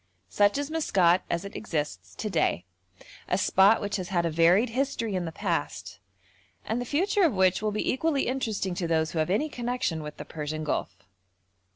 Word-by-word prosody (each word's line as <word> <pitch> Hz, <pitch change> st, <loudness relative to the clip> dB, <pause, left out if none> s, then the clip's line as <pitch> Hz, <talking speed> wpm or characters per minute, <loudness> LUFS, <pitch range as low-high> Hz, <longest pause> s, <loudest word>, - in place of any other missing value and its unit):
Such 205 Hz, -, +3 dB
is 285 Hz, +1 st, -3 dB
Maskat 185 Hz, -, +3 dB
as 170 Hz, +3 st, -2 dB
it 200 Hz, -, -9 dB
exists 120 Hz, -, -4 dB
to -, -, -4 dB
day, 165 Hz, -, 0 dB, 0.6 s
a 180 Hz, -, +2 dB
spot 195 Hz, +2 st, +4 dB
which 205 Hz, 0 st, -2 dB
has 185 Hz, -2 st, -5 dB
had 175 Hz, -3 st, +1 dB
a 165 Hz, -, 0 dB
varied 175 Hz, +9 st, +4 dB
history 240 Hz, -3 st, -1 dB
in 180 Hz, -2 st, -1 dB
the 165 Hz, -, -4 dB
past, -, -, -3 dB, 0.7 s
and 230 Hz, +3 st, -1 dB
the -, -, -4 dB
future 385 Hz, +7 st, +1 dB
of 320 Hz, -, +3 dB
which 185 Hz, 0 st, +3 dB
will 215 Hz, -, 0 dB
be 210 Hz, -, -2 dB
equally 285 Hz, +1 st, 0 dB
interesting 220 Hz, -7 st, -2 dB
to 175 Hz, -1 st, -2 dB
those 160 Hz, -1 st, +1 dB
who 165 Hz, -, -2 dB
have 155 Hz, -, 0 dB
any 215 Hz, +12 st, +1 dB
connection 245 Hz, -, -2 dB
with 150 Hz, 0 st, -8 dB
the -, -, -7 dB
Persian 155 Hz, 0 st, -5 dB
Gulf. 125 Hz, -9 st, -3 dB
195 Hz, 195 wpm, -27 LUFS, 165-245 Hz, 0.7 s, spot